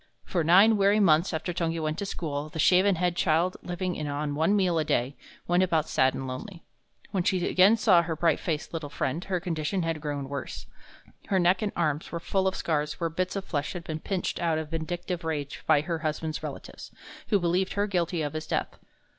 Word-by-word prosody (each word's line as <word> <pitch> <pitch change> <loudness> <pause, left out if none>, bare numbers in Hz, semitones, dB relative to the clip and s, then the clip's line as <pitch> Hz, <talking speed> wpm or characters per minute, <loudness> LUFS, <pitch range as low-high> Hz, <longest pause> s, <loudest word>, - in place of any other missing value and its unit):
For 175 -3 -1
nine 195 +7 +6
weary 200 +1 +4
months 170 -3 +4
after 175 +2 -3
Tungi 165 -1 -1
went 155 0 -2
to 200 - -3
school, 150 -5 -4
the 155 - -8
shaven 185 +4 +4
headed 175 0 0
child, 170 +2 +2
living 180 -1 -3
on 145 0 -2
one 160 +7 +2
meal 180 -5 +2
a - - +1
day, 140 -2 0 0.3
went 175 +1 +3
about 160 -4 +1
sad 130 0 +2
and 135 - -4
lonely. 165 +8 -7 0.5
When 190 - 0
she 180 -1 +1
again 195 +5 +5
saw 185 -6 +5
her 165 -1 -3
bright 165 0 +2
faced 160 -2 -3
little 160 -3 -4
friend, 145 +4 -2
her 185 -2 -1
condition 175 +1 -2
had 165 -2 -2
grown 145 -2 -3
worse. 140 -1 -6 0.6
Her 195 - +1
neck 180 +1 +3
and 210 -2 -1
arms 155 -2 -1
were 170 - -3
full 190 +3 0
of 190 - 0
scars 150 -2 -1
where 165 -2 -1
bits 180 +4 -2
of 195 -1 -3
flesh 145 -2 -2
had 175 -2 -6
been 155 -2 -5
pinched 185 +2 -3
out 165 -2 +1
in 160 - -2
vindictive 170 +3 -4
rage 150 -3 -4
by 155 -2 +5
her 165 +1 -3
husband's 155 0 -3
relatives, - - -8 0.4
who 210 - +3
believed 180 +2 0
her 205 0 +1
guilty 175 -4 -1
of 145 - -3
his 155 0 -5
death. - - -2
170 Hz, 215 wpm, -27 LUFS, 155-185 Hz, 0.6 s, nine